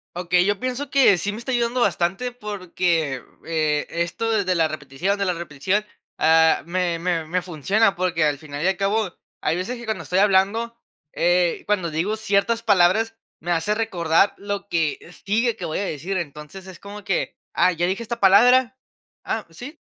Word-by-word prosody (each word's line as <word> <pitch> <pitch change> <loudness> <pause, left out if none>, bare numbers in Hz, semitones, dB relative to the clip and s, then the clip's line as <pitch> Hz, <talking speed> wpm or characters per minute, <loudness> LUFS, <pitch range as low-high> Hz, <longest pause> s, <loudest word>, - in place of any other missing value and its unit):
Okey. 180 0 +2
Yo 205 0 0
pienso 255 +3 -3
que 265 -9 +5
sí 205 - -1
me 210 - -7
está 235 +3 -5
ayudando 240 0 0
bastante, 195 +4 0
porque, 180 - -2 0.2
eh, 155 -2 0
esto 170 +7 -2
desde 200 -4 +1
la 165 -2 +3
repetición, 155 +6 -3
de 200 - 0
la 180 - +1
repetición, 175 +5 -2 0.3
ah, 160 0 +4
me 175 -1 -1
me 170 -2 -1
me 180 +3 -1
funciona, 190 +5 +1
porque 175 -2 0
al 145 -2 0
final 145 -1 -6
y - - +2
al 190 - +2
cabo, 200 0 0 0.3
hay - - 0
veces, 185 +8 -3
que 235 - -9
cuando 220 -5 -3
estoy 180 - -2
hablando, 205 +4 +2 0.4
eh, 175 0 +1
cuando 185 -5 0
digo 175 +8 -1
ciertas 220 +2 0
palabras, 220 +2 +3 0.2
me 175 - -4
hace 170 +5 +1
recordar 190 -4 +2
lo 200 0 -5
que 165 -5 0 0.3
sigue, 230 +3 +1
que 180 - -6
voy 160 - -3
a 200 - -1
decir. 175 +6 -3
Entonces, 150 +3 -7
es 185 -2 -11
como 205 +1 -10
que: 195 -3 -2 0.2
"Ah - - +4
dije 180 +5 -1
esta 235 +1 -5
palabra. 245 +6 +5 0.5
Ah, 220 - -3
¿sí?" 250 - -9
185 Hz, 180 wpm, -22 LUFS, 170-215 Hz, 0.5 s, que